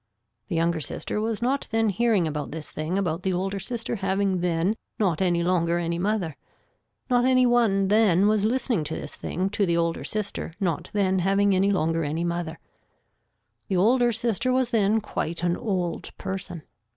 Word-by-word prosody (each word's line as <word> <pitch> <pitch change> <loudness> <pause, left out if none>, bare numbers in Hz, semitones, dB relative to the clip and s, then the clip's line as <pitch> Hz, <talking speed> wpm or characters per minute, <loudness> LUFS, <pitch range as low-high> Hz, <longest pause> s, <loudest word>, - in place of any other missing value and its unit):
The 180 - -3
younger 165 0 +1
sister 210 +7 -3
was 225 +1 -2
not 270 +3 0
then 225 -1 +2
hearing 210 -2 +2
about 150 -2 -4
this 155 0 -6
thing 155 +5 -2
about 175 -3 -1
the 190 0 0
older 195 +2 -2
sister 235 +3 -3
having 195 -1 0
then 175 +3 +1 0.2
not 190 -7 +1
any 175 -2 +2
longer 170 -1 +1
any 170 0 -2
mother. 190 -5 -1 0.7
Not 245 -2 +3
any 255 0 +4
one 225 -5 +3
then 205 -2 +4
was 215 -1 +2
listening 235 -5 +1
to 160 - -4
this - - -4
thing 190 +2 -3
to 205 - 0
the 170 -3 +2
older 170 0 0
sister 205 -5 -3
not 180 -2 -1
then 190 -2 +2
having 195 +2 +3
any 190 +2 +3
longer 165 -3 +1
any 155 +3 -2
mother. 170 -1 -3 1.1
The 190 - 0
older 240 +5 +4
sister 230 +2 0
was 255 -1 +1
then 220 -1 +2
quite 170 -4 -4
an 175 0 +2
old 180 -5 -3
person. 190 -4 -5
190 Hz, 175 wpm, -25 LUFS, 170-215 Hz, 1.1 s, any